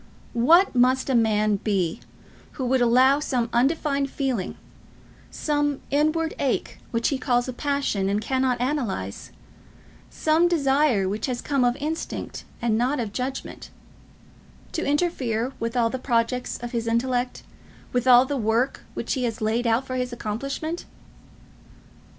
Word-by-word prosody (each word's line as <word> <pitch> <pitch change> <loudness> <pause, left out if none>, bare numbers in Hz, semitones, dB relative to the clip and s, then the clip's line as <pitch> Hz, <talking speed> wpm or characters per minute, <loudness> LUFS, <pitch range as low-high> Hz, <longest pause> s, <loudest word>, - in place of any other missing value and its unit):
What 325 +11 +5
must 255 +2 +3
a - - +1
man 215 -3 +3
be 190 -5 -1 0.5
who 260 - -4
would 255 +1 +2
allow 255 +4 +5
some 245 -5 -1
undefined 275 +2 +1
feeling, 260 -9 -2 0.7
some 290 -2 -1
inward 310 +3 +1
ache 270 -3 -1
which 230 -1 0
he 275 - -1
calls 245 -1 +1
a 255 - -4
passion 275 -8 -1
and 200 +1 +1
cannot 260 +2 0
analyse, 240 - -3 0.8
some 320 +2 +2
desire 275 - +2
which 210 +6 -2
has 250 -2 -2
come 275 -1 0
of 245 0 +2
instinct 310 +3 -4 0.2
and 225 -2 +2
not 255 +4 +1
of 220 -4 -3
judgment, 260 +2 -5 1.0
to 335 - -2
interfere 270 -6 0
with 230 +2 -2
all 230 -1 +2
the 260 - -3
projects 245 0 0
of 240 - -4
his 230 -1 -2
intellect, 245 +2 0 0.5
with 245 0 0
all 250 0 +8
the 280 +1 -2
work 230 +3 0
which - - -2
he 255 -3 -1
has 230 -2 -3
laid 225 +3 0
out 230 +3 +2
for 255 -1 -4
his 250 0 -2
accomplishment? 275 +9 -4
250 Hz, 145 wpm, -24 LUFS, 230-280 Hz, 1.0 s, all